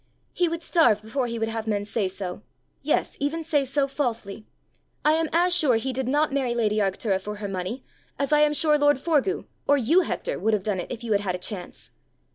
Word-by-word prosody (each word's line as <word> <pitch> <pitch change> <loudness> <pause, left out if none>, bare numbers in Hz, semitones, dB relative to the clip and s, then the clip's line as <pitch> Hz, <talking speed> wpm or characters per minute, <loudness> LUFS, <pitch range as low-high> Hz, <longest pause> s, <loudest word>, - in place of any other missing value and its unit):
He 355 - +1
would 335 0 -4
starve 240 - +3
before 245 +3 -2
he 235 0 -4
would 225 0 -1
have 225 0 -4
men 205 -1 -1
say 205 -1 -1
so 185 0 -6 0.4
yes, - - 0
even 305 +4 -1
say 300 -3 +1
so 275 +1 0
falsely. 230 -7 -4 0.6
I 305 - +6
am 320 0 +1
as 350 +2 +3
sure 290 -9 +5
he 260 +4 -1
did 260 0 -2
not 295 +2 +1
marry 260 -4 0
lady 215 -3 +1
Arctura 195 -1 0
for 210 +2 -5
her 205 0 -5
money, 195 +7 -4 0.3
as 280 +1 0
I 300 - +5
am 300 0 +4
sure 300 -1 +3
lord 290 -1 +4
Forgue, 330 +5 0 0.2
or 285 - +5
you, 300 +9 +4
Hector, - - -3
would 220 0 +2
have 200 - -3
done 205 -3 -1
it 175 - -6
if 240 -2 -6
you 230 - -4
had 205 -1 +3
had 185 -3 -2
a - - -3
chance. 180 0 -6
245 Hz, 230 wpm, -25 LUFS, 210-295 Hz, 0.6 s, I